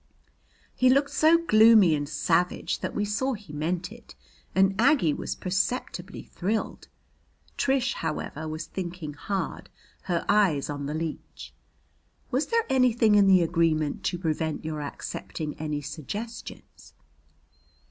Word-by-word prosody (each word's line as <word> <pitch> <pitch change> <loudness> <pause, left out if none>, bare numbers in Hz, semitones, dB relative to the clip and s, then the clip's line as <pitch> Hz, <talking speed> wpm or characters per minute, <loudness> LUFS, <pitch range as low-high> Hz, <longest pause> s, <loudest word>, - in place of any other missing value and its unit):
He 255 - +3
looked 280 +2 +3
so 320 +2 +5
gloomy 220 - +6
and 145 -1 -2
savage 175 +3 0
that - - -4
we 210 - 0
saw 235 +6 -1
he 205 -9 -10
meant 170 +5 -2
it, 235 0 -14 0.4
and 190 +1 +4
Aggie 245 - +4
was - - -4
perceptibly 185 -1 -3
thrilled. 210 +5 -3 0.7
Trish, 270 -2 +1
however, 155 +1 -4
was 155 +1 -5
thinking 175 -4 -6
hard, 190 +6 -4 0.4
her 175 -2 -1
eyes 185 -9 +2
on 145 -1 -4
the 150 - -3
leech. 160 -1 -6 0.8
"Was 270 +4 0
there 460 -1 +1
anything 245 -5 +3
in 205 -1 +5
the 185 -2 +6
agreement 160 -3 0
to 175 - 0
prevent 160 -2 -2
your 155 -1 -3
accepting 150 +1 -5
any 150 -1 -3
suggestions?" 200 - -8
185 Hz, 130 wpm, -26 LUFS, 155-225 Hz, 0.8 s, gloomy